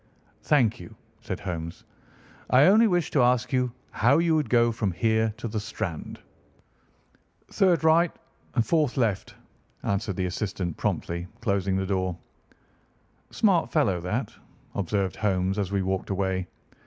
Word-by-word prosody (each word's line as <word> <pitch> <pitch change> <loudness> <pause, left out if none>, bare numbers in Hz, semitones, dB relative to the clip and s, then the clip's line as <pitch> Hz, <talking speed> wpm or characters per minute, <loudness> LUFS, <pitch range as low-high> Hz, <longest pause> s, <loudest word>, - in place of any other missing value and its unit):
"Thank 125 -6 +2
you," 85 - -11 0.3
said - - -5
Holmes, 85 -3 -5 0.7
"I 130 +2 +6
only 220 +5 +6
wished 175 -5 0
to 140 - +4
ask 125 +1 +2
you 125 -1 +1 0.2
how 125 +6 +3
you 165 0 +2
would 155 -2 0
go 120 -1 +4
from 110 -3 -1
here 110 +3 +1
to - - -5
the 110 0 -3
Strand." 90 -5 -5 1.3
"Third 175 -5 +3
right, 165 +2 +4 0.5
fourth 150 -1 +1
left," 110 -6 -1 0.5
answered 100 0 -1
the 95 - -1
assistant 90 -3 -3
promptly, 85 +1 -2
closing 100 -4 0
the 95 0 0
door. 95 -2 -1 1.1
"Smart 190 -6 +2
fellow, 100 - +1
that," 105 +6 -3 0.4
observed 100 0 -1
Holmes 95 -1 0
as 100 -2 -2
we 100 -1 0
walked 95 0 -2
away. 95 -2 -1
105 Hz, 140 wpm, -26 LUFS, 95-130 Hz, 1.3 s, I